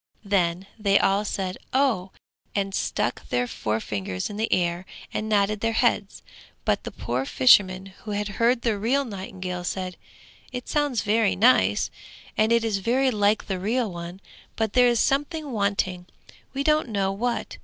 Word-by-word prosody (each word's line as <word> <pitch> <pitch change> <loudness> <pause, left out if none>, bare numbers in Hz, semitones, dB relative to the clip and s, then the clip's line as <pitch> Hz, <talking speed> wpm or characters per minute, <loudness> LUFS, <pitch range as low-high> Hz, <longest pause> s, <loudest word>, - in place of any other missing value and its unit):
Then 185 -2 +1
they 200 -1 +4
all 195 +2 +2
said 190 -3 -3
'Oh,' 255 -9 +2 0.5
and 195 -1 -1
stuck 120 - -2
their 125 0 +1
forefingers 105 - -3
in 205 - -7
the 220 +1 -1
air 175 0 0 0.3
and 220 - -2
nodded 210 0 +2
their 225 +1 0
heads; 225 -4 0 0.4
but - - +1
the - - -3
poor 125 +2 -2
fishermen 185 +9 +4
who 220 - -9
had 205 0 -1
heard 235 +1 +3
the 220 -4 0
real 265 +7 +1
nightingale 185 -4 -5
said, 185 0 -4 0.5
'It 250 -1 -6
sounds 290 -6 0
very 215 0 +2
nice, 105 - +4 0.4
and 215 +1 +2
it 235 -1 +4
is 210 -3 0
very 255 +6 +2
like 210 -1 +2
the 190 -2 -3
real 220 +3 0
one, 175 +2 -8 0.3
but 220 -2 -1
there 250 -1 +6
is 240 -2 +2
something 290 +3 0
wanting, 200 -4 -1 0.4
we 275 +1 -2
don't 305 -3 +2
know 195 -3 0
what.' 235 +5 -2
205 Hz, 165 wpm, -25 LUFS, 185-235 Hz, 0.5 s, there